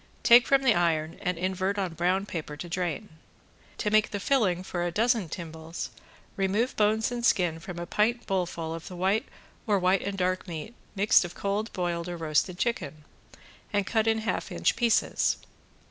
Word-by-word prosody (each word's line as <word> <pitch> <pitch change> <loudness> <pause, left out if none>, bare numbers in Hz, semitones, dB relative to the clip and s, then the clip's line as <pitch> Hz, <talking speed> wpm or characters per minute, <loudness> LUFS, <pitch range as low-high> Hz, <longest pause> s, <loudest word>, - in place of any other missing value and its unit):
Take 240 +1 +7
from 275 -1 +4
the 250 -4 +5
iron 165 -3 0
and 180 -1 -1
invert 190 +3 -1
on 185 -4 -1
brown 180 +4 +1
paper 155 -6 -6
to 175 - -6
drain. 180 +4 -3 0.7
To 210 - -1
make 215 0 +4
the 200 - -3
filling 195 -8 +1
for 175 -2 -3
a 175 - 0
dozen 225 -1 +1
timbales, 160 0 -6 0.4
remove 200 +6 0
bones 215 +2 +2
and 240 -1 -4
skin 175 -8 +2
from 170 +1 -8
a 175 - -4
pint 235 +6 +1
bowlful 175 -4 -2
of 165 0 -7
the 180 - -8
white 190 +5 +1 0.4
or 205 -2 +3
white 185 0 +2
and 200 0 -4
dark 185 +1 0
meat 165 +5 -6 0.2
mixed 205 +1 +5
of 175 0 -7
cold 205 +3 -2
boiled 175 -2 -2
or 175 - -4
roasted 165 +3 0
chicken, 170 -10 -2 0.7
and 205 -2 +1
cut 220 +2 +1
in 225 0 +3
half 220 - -2
inch - - +1
pieces. 235 -2 +2
185 Hz, 180 wpm, -28 LUFS, 170-215 Hz, 0.7 s, Take